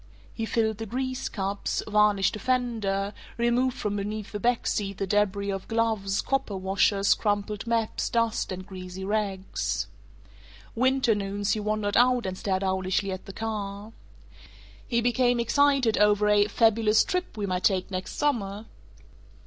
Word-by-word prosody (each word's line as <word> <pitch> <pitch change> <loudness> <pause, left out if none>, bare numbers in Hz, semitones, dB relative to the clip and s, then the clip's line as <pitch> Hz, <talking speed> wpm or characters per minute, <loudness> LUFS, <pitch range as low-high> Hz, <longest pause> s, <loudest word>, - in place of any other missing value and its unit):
He 225 - -3
filled 220 -2 0
the 225 - -4
grease 255 +3 -3
cups, 200 0 -2
varnished 210 -2 +3
a - - -6
fender, 215 -5 -1 0.2
removed 240 +2 +1
from 205 -1 -2
beneath 210 +1 -4
the 210 - -4
back 240 +2 +1
seat 195 -2 -1
the 195 - -1
debris 200 0 +1
of 195 -1 -5
gloves, 220 -4 0
copper 270 -7 -1
washers, 195 +1 +3
crumpled 205 0 -2
maps, 230 -1 0
dust, 230 -3 0
and 185 0 -5
greasy 185 -1 -7
rags. 200 -2 -2 0.9
Winter 255 0 +2
noons 200 0 -2
he 215 - +1
wandered 210 -1 -1
out 245 -1 +4
and 185 -1 -3
stared 190 0 -1
owlishly 190 +1 0
at 185 - -6
the 195 - -7
car. 210 -1 -5 0.9
He 235 -2 +1
became 245 +1 +2
excited 265 -1 +3
over 210 0 +4
a 205 0 +4
fabulous 220 0 +3
"trip 365 -10 -3
we 205 - -1
might 185 -1 -1
take 190 -1 +1
next 185 0 -4
summer." 215 -8 -1
210 Hz, 150 wpm, -27 LUFS, 195-230 Hz, 0.9 s, out